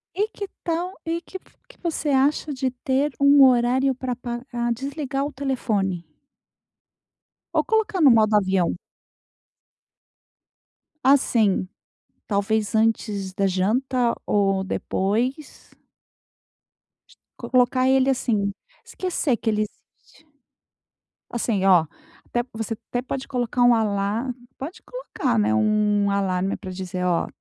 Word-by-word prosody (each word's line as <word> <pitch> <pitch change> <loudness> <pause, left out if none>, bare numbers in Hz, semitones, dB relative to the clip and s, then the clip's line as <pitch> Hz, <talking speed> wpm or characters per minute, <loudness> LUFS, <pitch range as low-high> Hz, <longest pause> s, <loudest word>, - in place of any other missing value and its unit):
E 410 +3 +1
que 410 -2 -7 0.2
tal 345 +2 -1
e 335 +1 -1
que 380 - -9
v - - -37 0.2
que - - -18
você 325 -3 -2
acha 285 +2 +2
de 265 -1 -1
ter 265 +3 -1
um 280 0 +7
horário 255 +2 +3
pra 250 -1 -4
pa 240 -1 -5
pra 240 -1 -1
desligar 275 +2 -3
o 290 - -4
telefone 215 -10 -1 1.5
ou - - +2
colocar 440 -5 0
no 285 -5 +7
modo 220 -2 +4
avião? 190 -3 +1 2.3
Assim, 230 -8 +3 0.6
talvez 210 +1 0
antes 215 -3 0
da 195 0 +1
janta 235 +6 +1
ou 195 -2 +1
depois. 230 +9 -2 1.7
Colocar 255 0 +3
ele 265 0 +4
assim, 215 -6 0 0.3
esquecer 335 -9 -1
que 225 - -4
ele 215 -1 +1
existe. 265 +8 -12 1.0
Assim 220 -5 -1
oh, 180 -4 +5 0.4
até 240 0 -1
você 225 0 -3 0.2
até 245 - -1
pode 265 +1 -5
colocar 245 -1 -1
um 245 -1 +6
alar 215 +3 -1 0.2
pode 300 +7 -7
colocar, - - -3
né, 105 +1 +2
um 205 - +2
alarme, 190 -1 0
pra 190 -3 -8
dizer: 185 0 -4
"Oh, 175 -2 +1
240 Hz, 120 wpm, -23 LUFS, 200-270 Hz, 2.3 s, um